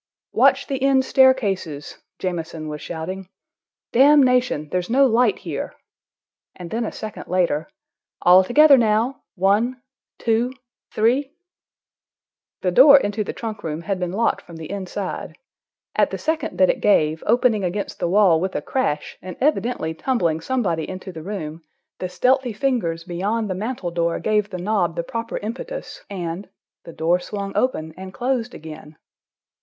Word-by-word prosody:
"Watch - - +4
the 270 -2 -3
end 270 -1 +3
staircases!" 200 - +2 0.2
Jamieson 165 -3 -4
was 150 0 -6
shouting. 180 +3 -6 0.6
"Damnation—there's 250 - +3
no 270 +4 +5
light 245 0 +3
here!" - - -5 0.8
And 175 -2 -9
then 230 +1 -1
a - - -4
second 215 -1 -8
later. 175 - 0 0.5
"All 180 +1 +7
together 275 +6 +6
now. 225 +4 +1
One—two—three—" 245 +3 -1 1.3
The 180 - +2
door 280 +8 +8
into 210 -2 -2
the - - -4
trunk 220 -2 -6
room 160 +1 -4
had 195 0 -2
been 180 -1 -2
locked 225 +5 0
from 170 - -13
the 160 +1 -8
inside. 195 -1 -5 0.6
At - - +3
the - - -4
second 320 -2 -2
that 185 -1 +5
it - - -7
gave, 160 -6 +3
opening 230 -3 +3
against 190 +3 -3
the - - 0
wall 185 -4 +4
with 190 +1 -2
a - - -1
crash 150 - -2
and 185 0 -8
evidently 240 - 0
tumbling 165 -5 0
somebody 175 -8 -1
into 185 +1 -7
the 160 -2 -8
room, 165 -4 -6 0.4
the 185 - -3
stealthy 255 +3 +1
fingers 210 -10 -1
beyond 200 +5 -2
the - - +1
mantel 200 -2 -4
door 170 0 0
gave 210 -1 0
the 185 - -5
knob 180 -3 0
the 170 - -2
proper 230 +5 -4
impetus, 465 - -6
and—the 175 -2 -8
door 170 +3 +1
swung 200 +1 -6
open, 160 -11 -1
and 190 0 -9
closed 245 -1 -1
again. 155 -1 -11
200 Hz, 145 wpm, -22 LUFS, 175-245 Hz, 1.3 s, door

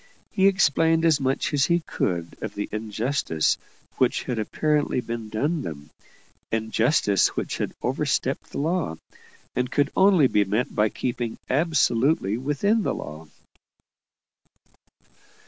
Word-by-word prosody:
He 190 0 +3
explained 165 -3 +3
as 160 -3 +4
much 135 +3 0
as 140 -1 +3
he 170 0 +2
could 85 - -3
of 110 -2 -5
the 105 - -3
injustice 110 - -1 0.4
which - - +2
had 120 -3 -3
apparently 150 +6 0
been 115 -2 -5
done 145 +10 -1
them 75 - -8 0.6
injustice 110 - +2
which - - -3
had - - -3
overstepped - - -1
the - - -7
law, 160 - -1 0.6
and 125 0 0
could 145 -1 +1
only 190 -6 +5
be 105 -5 +3
met 105 +5 -1
by 105 0 +2
keeping 120 -1 -3
absolutely 135 - +2
within 150 - +1
the - - -1
law. 75 +1 -8
125 Hz, 130 wpm, -24 LUFS, 110-155 Hz, 0.6 s, only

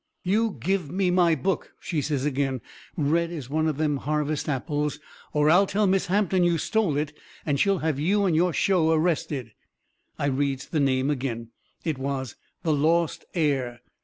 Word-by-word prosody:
"You 215 +3 +1
give 190 -6 0
me 185 +2 +1
my 175 -2 +4
book," 170 +7 -2
she 160 -5 -2
says 145 -2 -1
agin, 135 -3 -1 0.4
red 165 +2 +1
as 145 -7 -7
one 155 +1 +1
of 155 -3 -1
them 150 -2 +1
harvest 150 +1 -1
apples, 145 +2 -1 0.3
"or 150 +1 +3
I'll 195 +4 +5
tell 210 +2 +1
Miss 195 0 +2
Hampton 190 -1 +2
you 170 -1 +3
stole 190 -4 +1
it 150 0 -2 0.3
and 145 -3 0
she'll 195 +2 +3
have 155 -4 0
you 200 +6 +2
and 175 -4 +2
your 175 +2 +3
show 170 -1 +2
arrested." 155 -7 0 0.7
I - - -1
reads 140 -1 -1
the 155 - 0
name 135 0 +2
agin. 120 -4 -3 0.3
It 155 -5 -2
was 135 -2 -3 0.3
"The 160 - +2
Lost 160 +3 +1
Heir." 135 -7 0
155 Hz, 175 wpm, -26 LUFS, 140-175 Hz, 0.7 s, I'll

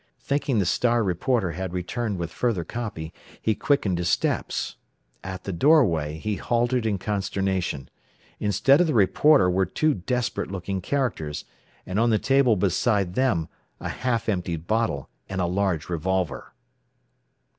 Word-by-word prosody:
Thinking 140 -3 0
the 100 - +2
"Star" 120 +6 +2
reporter 95 +1 0
had 90 +2 -5
returned 95 +4 -2
with 85 -2 -4
further 115 -6 0
copy, 95 -8 -5 0.3
he 110 - +1
quickened 100 -8 +1
his 90 0 0
steps. - - -1 0.5
At 95 0 -6
the 100 - -4
doorway 85 - +3
he 105 +5 -2
halted 120 0 +1
in 105 -2 0
consternation. 95 - -2 0.5
Instead 105 - +4
of 180 - +3
the 155 - 0
reporter 110 +2 +5
were 90 0 +2
two 155 - +1
desperate 120 +6 -2
looking 95 0 -3
characters, 95 - -2 0.4
and 95 +3 -2
on 115 +1 +3
the 110 - +4
table 135 -1 +3
beside 100 0 +1
them 100 -10 +1 0.3
a - - -4
half 125 -3 -1
emptied 85 -5 -2
bottle 110 - 0 0.2
and 95 - -3
a 90 - +2
large 90 -2 0
revolver. 90 +1 -2
100 Hz, 145 wpm, -25 LUFS, 90-120 Hz, 0.5 s, reporter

